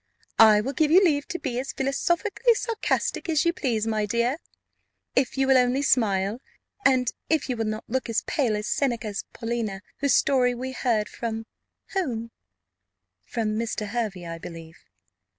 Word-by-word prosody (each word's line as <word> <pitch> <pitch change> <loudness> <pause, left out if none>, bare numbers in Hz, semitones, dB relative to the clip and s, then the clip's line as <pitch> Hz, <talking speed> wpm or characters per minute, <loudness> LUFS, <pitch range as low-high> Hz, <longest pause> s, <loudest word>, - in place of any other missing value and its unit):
"I 215 -2 +8
will 270 +6 -3
give 305 +2 +2
you 345 +4 +8
leave 290 -4 +1
to 350 - -3
be 255 -7 -3
as 270 - -4
philosophically 345 - +1
sarcastic 445 -4 -1
as 310 0 +2
you 340 - +3
please, 230 -9 -1
my 215 -2 0
dear, 235 +6 +1 0.8
if 265 0 +1
you 270 - +3
will 265 -1 +5
only 250 +3 +2
smile, 210 -3 +1 0.4
and 255 -3 +3 0.2
if 315 -3 +1
you 255 - -1
will 225 -1 -2
not 215 0 -4
look 260 +1 -2
as 225 - 0
pale 245 -8 0
as 210 - -4
Seneca's 230 -6 -1
Paulina, 225 -4 -3 0.2
whose 280 -2 +3
story 250 -3 +3
we 260 +2 -4
heard 230 -5 0
from 225 -1 -4 0.5
whom?" 235 - -2 0.9
"From 215 - -2
Mr. 220 -2 -3
Hervey, 210 -6 -3
I 165 0 -6
believe." 165 -1 -10
240 Hz, 165 wpm, -25 LUFS, 215-275 Hz, 0.9 s, I